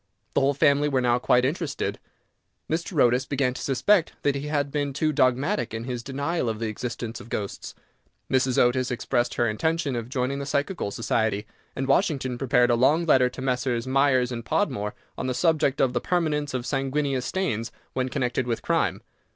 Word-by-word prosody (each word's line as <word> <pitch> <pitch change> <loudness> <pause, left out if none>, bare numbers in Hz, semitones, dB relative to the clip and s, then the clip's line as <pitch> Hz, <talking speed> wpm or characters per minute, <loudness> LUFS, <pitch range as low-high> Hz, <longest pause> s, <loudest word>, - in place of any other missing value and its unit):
The - - +2
whole 140 +1 +2
family 145 0 +3
were 135 -2 +1
now 125 -1 +2
quite 125 0 +3
interested; 150 0 -2 0.7
Mr. 165 0 -2
Otis 125 +2 +3
began 135 -3 0
to - - -7
suspect 165 +7 +2
that 145 - +3
he 140 +1 -4
had 145 -2 -1
been 145 -1 -1
too 155 +2 0
dogmatic 135 - +1
in 115 - -4
his 125 -1 -4
denial 140 +2 -2
of 110 - -3
the 115 - -3
existence 115 +1 -5
of 115 - -13
ghosts, 100 -4 -5 0.5
Mrs. 130 -1 +1
Otis 125 +1 +3
expressed 120 -1 -1
her 120 - +2
intention 155 +5 0
of 115 0 -4
joining 130 +1 -1
the 140 - -5
Psychical 145 - -1
Society, 110 -1 -1 0.3
and 135 - -2
Washington 135 -5 +1
prepared 125 -2 +3
a - - +4
long 150 +8 +3
letter 130 -5 +4
to 130 - -8
Messrs. 125 -2 0
Myers 130 -2 +2
and 115 -1 -4
Podmore 120 - -1 0.2
on 130 - -2
the 130 - -1
subject 155 -4 +2
of 130 -2 +2
the 120 - 0
Permanence 150 -6 0
of 125 -1 -3
Sanguineous 135 -1 -1
Stains 120 - -2 0.2
when 130 0 -1
connected 125 -1 -1
with 115 -2 -2
Crime. - - 0
130 Hz, 185 wpm, -25 LUFS, 120-145 Hz, 0.7 s, a